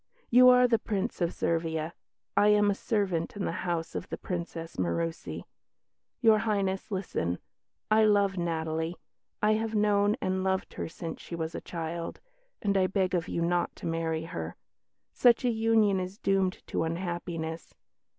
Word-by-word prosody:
You 250 +1 +8
are 250 0 +7
the 230 -2 +3
Prince 210 -1 -2
of 170 0 +2
Servia; 165 -1 -1 0.4
I 205 - +5
am 210 -1 +5
a - - +2
servant 195 -5 -1
in 200 - -2
the - - -1
household 170 -1 -3
of - - -32
the - - -4
Princess 170 -2 -5
Murussi. 160 - -2 0.8
Your 220 -3 +6
Highness, 200 -3 -1
listen! 175 - -2 0.5
I 215 0 +6
love 200 -2 +3
Natalie. 160 -1 -2 0.5
I 210 - +5
have 220 0 -1
known 205 0 +3
and 185 0 -1
loved 190 0 -1
her - - -4
since 165 0 -7
she 170 - -7
was 160 0 -3
a - - -5
child; 165 0 -5 0.4
and 200 -1 +1
I 185 -1 +3
beg 190 -1 0
of 175 -1 0
you 170 - -1
not 175 0 0
to - - -10
marry 165 -1 -1
her. 80 - -5 0.6
Such 245 0 +4
a 245 - +3
union 220 -3 +3
is 185 +2 -5
doomed 195 -4 0
to - - -2
unhappiness. 165 -1 -4
185 Hz, 165 wpm, -29 LUFS, 165-205 Hz, 0.8 s, You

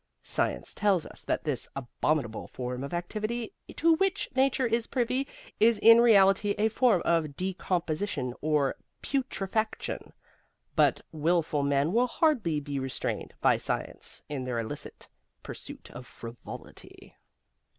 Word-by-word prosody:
Science - - -1
tells 200 -6 +2
us - - -10
that - - -1
this 145 -6 -1
abominable 135 -2 -1
form 125 0 -5
of 140 - -5
activity 215 +6 -3 0.2
to 330 +1 +4
which 390 +2 +1
Nature 265 0 +3
is 230 0 0
privy 255 +2 0 0.3
is 225 0 +5
in 230 +2 +8
reality 205 -2 +5
a 220 +1 +3
form 225 -5 +3
of 160 -4 +1
decomposition 180 -6 -2
or 150 -3 +2 0.3
putrefaction; 220 -5 -2 0.6
but - - +4
willful 160 -1 +1
men 140 +4 +1
will 245 +2 +4
hardly 235 - +2
be 140 -1 -4
restrained 130 -1 -3
by - - +5
science - - -4
in 140 -3 -4
their 125 -2 -2
illicit 115 -1 -5 0.4
pursuit - - -8
of 125 -1 -9
frivolity. 115 +1 -11
180 Hz, 130 wpm, -29 LUFS, 140-230 Hz, 0.6 s, in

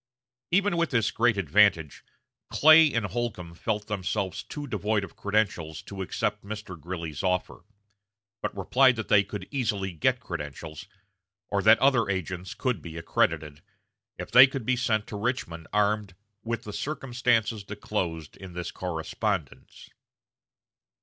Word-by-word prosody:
Even 195 0 +2
with 170 -1 +1
this 115 -4 +1
great 115 -2 +2
advantage, 90 -3 +3 0.5
Clay 155 0 +7
and 115 -4 0
Holcombe 100 -5 -4
felt 105 +4 -2
themselves 100 -1 -2
too 145 -1 -7
devoid 105 -4 -1
of - - -9
credentials 100 -7 -1
to 100 -1 -7
accept 105 +2 -2
Mr. 105 -2 -7
Greeley's 85 -3 -5
offer, 90 -1 -2 0.8
but - - -4
replied 130 +7 +4
that 110 -2 -5
they 100 -1 +6
could 100 -1 -7
easily 110 -8 -1
get 80 -4 +1
credentials, 80 -1 -7 0.6
or 100 - +1
that 110 +2 +7
other 130 -6 +3
agents 90 -1 -3
could 125 -9 -1
be 80 0 -8
accredited, 75 -2 0 0.6
if - - -7
they 125 +2 +10
could 135 -3 -5
be 130 - +2
sent 115 -4 0
to - - -8
Richmond 100 -7 -3
armed 105 -2 +1 0.3
with 115 0 -3
"the 105 - -7
circumstances 120 -6 0
disclosed 95 -6 -4
in 95 -2 -10
this 90 0 -5
correspondence." 90 - -4
105 Hz, 140 wpm, -27 LUFS, 90-115 Hz, 0.8 s, they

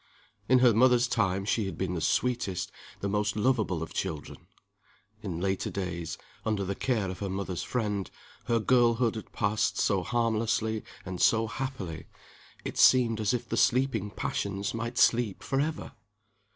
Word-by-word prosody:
In 130 - +6
her 120 - +6
mother's 125 +2 +4
time 95 -5 0
she 105 0 0
had 90 -4 -6
been 95 -1 -2
the 85 - -3
sweetest, 100 -4 0 0.3
the 100 - -1
most 105 0 0
lovable 105 -7 +1
of 80 - -8
children. - - -5 0.7
In 90 -6 -4
later 95 +1 -1
days, 85 -4 -4 0.3
under 105 -3 0
the 95 +1 -2
care 110 -2 -1
of 90 - -8
her 100 - -3
mother's 95 -2 -3
friend, 105 -5 -2 0.4
her 115 - +2
girlhood 120 0 +3
had 110 - -8
passed 110 +2 0
so 100 -3 +2
harmlessly 110 0 0 0.2
and 95 -2 -5
so 115 0 +4
happily 110 -9 -5 0.6
it - - -4
seemed 120 -4 +5
as 105 -2 +1
if 120 -1 -2
the 115 - -2
sleeping 120 -5 +2
passions 100 -1 -3
might 115 +2 -4
sleep 115 -5 +3
forever! 150 +4 -1
110 Hz, 155 wpm, -29 LUFS, 95-120 Hz, 0.7 s, In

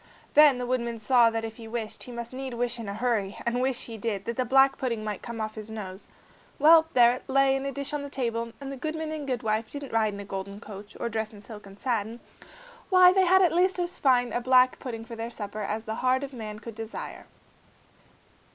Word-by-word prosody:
Then 295 -3 +7
the 250 - -3
woodman 235 -2 -1
saw 235 +1 +4
that 225 0 -3
if 225 0 -7
he 225 -2 -9
wished, 225 -1 -5
he 250 - -8
must 235 0 -7
need 260 -1 -5
wish 245 0 -1
in 220 -3 -5
a - - -3
hurry; 220 -4 -1
and 240 +1 0
wish 260 -1 0
he 225 -2 -8
did, 200 -2 -3
that 235 - -3
the 255 - 0
black 270 +2 +4
pudding 230 -4 -2
might 210 -2 -4
come 235 -1 -7
off 215 0 -3
his 215 0 -8
nose. 200 -3 -7 0.5
Well! 320 +2 +7
there 240 -1 +7
it 255 - -9
lay 270 0 +4
in 270 +1 -2
a - - -2
dish 280 +1 -3
on 295 - -1
the 285 - -6
table, 235 -4 -1
and 230 - -13
if 275 - -6
the 275 - -6
goodman 310 +3 -4
and 300 -2 -5
goodwife 225 -3 -1
didn't 285 -3 -7
ride 215 -2 +1
in - - -8
a 200 - -7
golden 195 +1 -6
coach, 205 -2 -10
or - - -1
dress 220 -1 -3
in 205 - -12
silk 210 -1 -11
and 195 +1 -14
satin, 230 -2 -2 0.7
why, 365 -1 +7
they 380 -1 +4
had 375 +2 +5
at 340 -3 +3
least 370 +2 +3
as 355 0 -3
fine 245 -3 +3
a 240 - 0
black 255 0 +4
pudding 225 -3 -6
for 230 0 -8
their 230 +1 -4
supper 215 -2 -6
as 215 +2 -3
the 220 - -3
heart 255 +3 +1
of 280 0 -6
man 215 -3 -6
could 230 +1 -9
desire. 225 +1 -7
235 Hz, 245 wpm, -27 LUFS, 220-270 Hz, 0.7 s, Then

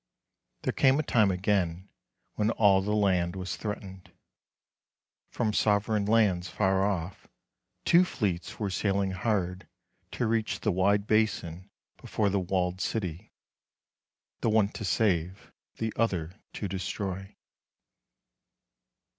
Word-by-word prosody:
There - - 0
came 135 0 +4
a 155 - +1
time 110 -7 +3
again 95 -1 0 0.5
when 105 0 0
all 100 -4 +4
the 105 +2 -1
land 90 -4 +1
was 95 -1 -4
threatened. 95 -3 -7 1.2
From 110 -3 -1
sovereign 105 0 +1
lands 100 -5 +2
far 95 +1 +1
ofT, 95 -2 -3 0.6
two 175 +1 +6
fleets 95 - -3
were 100 -3 -2
sailing 100 0 0
hard 95 -2 -2 0.5
to 120 - -1
reach 110 -1 -1
the 105 - +1
wide 100 +2 +2
basin 100 -4 0 0.3
before 105 -2 -1
the 100 - +1
walled 90 0 -1
city, 95 -3 -3 1.1
the - - 0
one 110 -2 +3
to 110 - -7
save, 95 -2 0 0.3
the 110 -1 -2
other 90 -7 -1 0.2
to 105 - -4
de 95 0 -4
stroy. 95 0 -4
100 Hz, 120 wpm, -28 LUFS, 90-105 Hz, 1.2 s, two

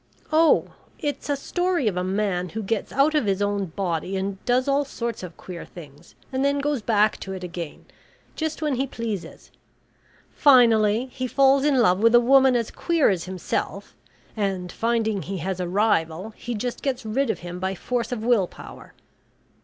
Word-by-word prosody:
"Oh! 320 0 +4 0.3
it's 290 0 -4
a 285 - +2
story 355 -1 -1
of 200 - 0
a 180 - -1
man 185 -2 -1
who 220 +3 -5
gets 205 +1 -2
out 280 +4 +3
of 295 -8 +1
his 195 -1 +1
own 205 -1 0
body 180 +1 -3
and 195 0 -4
does 250 +2 +2
all 280 +1 +2
sorts 235 -4 -5
of 180 -2 -9
queer 180 -2 -8
things, 150 -1 -14 0.2
and 260 +1 0
then 280 0 +2
goes 285 -2 -1
back 215 -1 +2
to 190 - -6
it 185 -1 -7
again, 170 -3 -7 0.5
just 315 0 -3
when 290 -4 0
he 270 +2 0
pleases. 225 -7 -6 0.8
Finally, 235 -3 +4
he 255 -1 -3
falls 270 +2 +4
in 290 -2 +3
love 190 -6 +4
with 230 +2 +5
a - - +9
woman 265 +1 +5
as 230 -2 -1
queer 335 -4 +2
as 180 -3 -2
himself, 185 0 -4 0.4
and 195 -4 -2
finding 225 -3 0
he 190 +4 -5
has 185 +2 -3
a 180 - -2
rival, 185 -1 0
he 240 +2 -6
just 240 +3 -4
gets 260 -4 -2
rid 245 +4 0
of - - -2
him 175 +1 -6
by 190 +1 -2
force 245 +5 -3
of 230 -3 -3
will 230 -6 +3
power. - - -13
220 Hz, 185 wpm, -24 LUFS, 190-265 Hz, 0.8 s, a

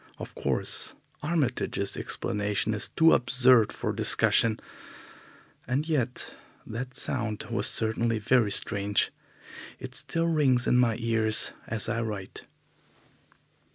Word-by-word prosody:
Of - - -8
course, - - -3 0.3
Armitage's 140 -10 -1
explanation 105 +1 -2
is 105 - -1
too 165 0 +4
absurd 125 -2 +4
for - - -3
discussion, 115 -1 +3 1.1
and 140 +5 -1
yet 130 -6 -2 0.3
that 125 +3 -6
sound 115 -6 -1
was - - 0
certainly 115 +1 0
very 110 0 +2
strange. 100 0 0 0.7
It - - -9
still 165 0 -2
rings 140 -7 +2
in 125 - +3
my 115 -3 +3
ears 115 -2 +1 0.2
as 110 -1 -3
I 115 0 -1
write. 105 -4 -6
115 Hz, 115 wpm, -27 LUFS, 110-130 Hz, 1.1 s, too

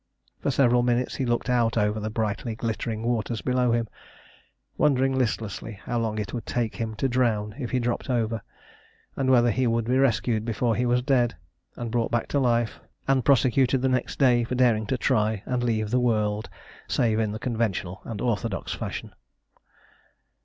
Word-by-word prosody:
For - - -1
several 125 -2 +4
minutes 120 0 +1
he 130 - -1
looked 120 +1 0
out 120 -2 +2
over 105 0 +1
the 110 +1 -3
brightly 110 +1 -2
glittering 115 -1 -3
waters 115 -1 -1
below 125 -1 +1
him, 115 -1 +1 0.9
wondering 135 -2 +2
listlessly 115 -3 -2
how 120 - -1
long 110 -2 -1
it 105 -2 -4
would 120 - -5
take 120 -3 -2
him 110 -2 -3
to 135 - 0
drown 115 -5 0
if 125 -4 -3
he 130 - 0
dropped 120 +2 -2
over, 115 -3 0 0.7
and 135 -1 0
whether 120 -2 +5
he 125 +3 +1
would 115 0 +1
be 125 +3 +2
rescued 120 -4 +2
before 115 0 0
he 125 +1 0
was 125 +1 +2
dead, 125 -5 +2 0.4
and 120 -2 -5
brought 120 -1 0
back 120 -1 0
to 145 - +1
life, 120 -3 +1 0.3
and 135 -2 +3
prosecuted 130 -1 +3
the 130 - +3
next 130 -1 -1
day 125 -3 +4
for 120 +2 -3
daring 115 -4 +3
to 130 - 0
try 110 -3 +1
and 125 -1 -1
leave 110 -3 0
the 125 - +3
world 110 -3 0 0.4
save 110 -2 +1
in 110 -2 0
the 110 - -4
conventional 110 -6 -2
and 110 -3 -6
orthodox 115 -3 -2
fashion. - - -5
120 Hz, 180 wpm, -26 LUFS, 110-125 Hz, 0.9 s, whether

